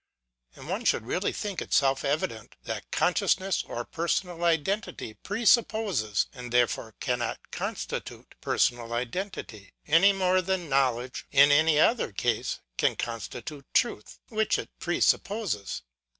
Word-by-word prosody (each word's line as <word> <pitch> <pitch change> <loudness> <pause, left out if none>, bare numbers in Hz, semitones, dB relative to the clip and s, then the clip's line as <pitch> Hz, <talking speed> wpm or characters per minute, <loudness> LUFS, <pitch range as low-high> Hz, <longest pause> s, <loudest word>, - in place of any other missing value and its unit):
And - - -11
one - - -2
should - - +2
really 180 - -1
think 205 -4 -4
it - - -1
self 135 -1 +3
evident, 120 -7 -2
that - - -5
consciousness 190 0 +1
of 120 0 -5
personal 170 +1 -1
identity 170 - 0
presupposes, 205 - +1
and 125 -3 -8
therefore 120 -2 +1
cannot 125 -3 -3
constitute, - - -5
personal 120 -1 +1
identity: 120 - -5
any 165 +6 +6
more 185 -1 +2
than 185 -2 -2
knowledge, 130 -2 0
in 140 +1 +7
any 155 +1 +5
other 225 - +3
case, 115 +3 -1 0.2
can - - +3
constitute 120 +4 -6
truth, 105 - 0
which 220 -1 +1
it - - -6
presupposes. 195 - 0
145 Hz, 125 wpm, -28 LUFS, 120-190 Hz, 0.2 s, in